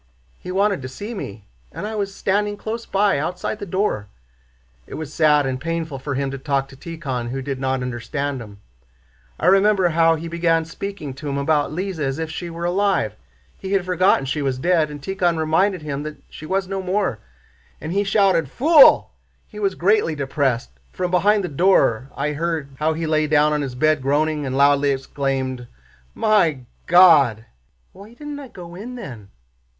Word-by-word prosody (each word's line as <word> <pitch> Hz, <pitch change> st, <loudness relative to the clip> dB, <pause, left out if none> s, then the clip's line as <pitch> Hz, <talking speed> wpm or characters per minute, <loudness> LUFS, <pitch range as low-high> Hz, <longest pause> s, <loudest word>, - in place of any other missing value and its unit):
He 180 Hz, -, -7 dB
wanted 200 Hz, -3 st, +1 dB
to 130 Hz, -, -5 dB
see 205 Hz, -, -7 dB
me, 105 Hz, -, -7 dB, 0.3 s
and 205 Hz, -, -6 dB
I 215 Hz, -, -4 dB
was 200 Hz, -2 st, -2 dB
standing 205 Hz, +1 st, -1 dB
close 225 Hz, +2 st, -5 dB
by, 200 Hz, -4 st, +2 dB
outside 180 Hz, +7 st, -3 dB
the 205 Hz, -, -6 dB
door. 185 Hz, -, -1 dB, 0.8 s
It -, -, -8 dB
was 155 Hz, -1 st, -6 dB
sad 150 Hz, -2 st, +4 dB
and 130 Hz, -1 st, -3 dB
painful 165 Hz, -3 st, -3 dB
for 140 Hz, +1 st, -4 dB
him 135 Hz, 0 st, -1 dB
to 135 Hz, -, -6 dB
talk 135 Hz, 0 st, -1 dB
to -, -, -13 dB
Tíkhon 135 Hz, -6 st, -5 dB
who 135 Hz, +2 st, -3 dB
did 135 Hz, 0 st, -4 dB
not 130 Hz, -1 st, -1 dB
understand 125 Hz, +3 st, -3 dB
him. 100 Hz, -3 st, -11 dB, 0.8 s
I -, -, -2 dB
remember 195 Hz, -1 st, +4 dB
how 165 Hz, 0 st, +3 dB
he 165 Hz, +1 st, -6 dB
began 165 Hz, -1 st, +1 dB
speaking 165 Hz, -4 st, -6 dB
to 145 Hz, +3 st, -6 dB
him 140 Hz, -, -2 dB
about 145 Hz, +1 st, +1 dB
Lise 185 Hz, +1 st, -4 dB
as 135 Hz, -2 st, -1 dB
if 160 Hz, 0 st, -4 dB
she 175 Hz, +1 st, -5 dB
were 170 Hz, +1 st, -5 dB
alive—he 190 Hz, -, -2 dB
had 190 Hz, -2 st, +1 dB
forgotten 185 Hz, -5 st, +2 dB
she 140 Hz, +3 st, -2 dB
was 135 Hz, -2 st, -1 dB
dead—and 150 Hz, -2 st, 0 dB
Tíkhon 180 Hz, -2 st, 0 dB
reminded 165 Hz, +3 st, +1 dB
him 145 Hz, -2 st, -4 dB
that 150 Hz, 0 st, -6 dB
she 155 Hz, -, -9 dB
was 190 Hz, +1 st, -1 dB
no 195 Hz, 0 st, -3 dB
more, 185 Hz, -, -1 dB, 0.6 s
and 160 Hz, -, -5 dB
he 200 Hz, +1 st, +2 dB
shouted, 195 Hz, -7 st, +2 dB
'Fool!' 295 Hz, -, +6 dB, 0.4 s
He 210 Hz, -, -10 dB
was 195 Hz, -2 st, 0 dB
greatly 190 Hz, -3 st, +2 dB
depressed. 135 Hz, -3 st, -1 dB, 0.2 s
From 180 Hz, -1 st, -3 dB
behind 200 Hz, +3 st, +3 dB
the -, -, -2 dB
door 140 Hz, -, +2 dB
I 150 Hz, +2 st, -1 dB
heard 160 Hz, -2 st, -2 dB
how 155 Hz, +1 st, +1 dB
he 165 Hz, +1 st, -3 dB
lay 155 Hz, -1 st, +1 dB
down 150 Hz, 0 st, +3 dB
on 150 Hz, -, 0 dB
his 135 Hz, -3 st, -4 dB
bed 155 Hz, +2 st, +2 dB
groaning 150 Hz, +2 st, 0 dB
and 130 Hz, 0 st, -2 dB
loudly 140 Hz, 0 st, +4 dB
exclaimed, 135 Hz, -2 st, -2 dB, 0.5 s
'My 185 Hz, -11 st, +2 dB, 0.3 s
God!' 150 Hz, -, +6 dB, 0.5 s
Why 205 Hz, +4 st, -14 dB
didn't 295 Hz, +1 st, -7 dB
I 280 Hz, -, -9 dB
go 175 Hz, -7 st, -11 dB
in 225 Hz, +8 st, -8 dB
then? 120 Hz, -, -9 dB
160 Hz, 185 wpm, -21 LUFS, 140-190 Hz, 0.8 s, Fool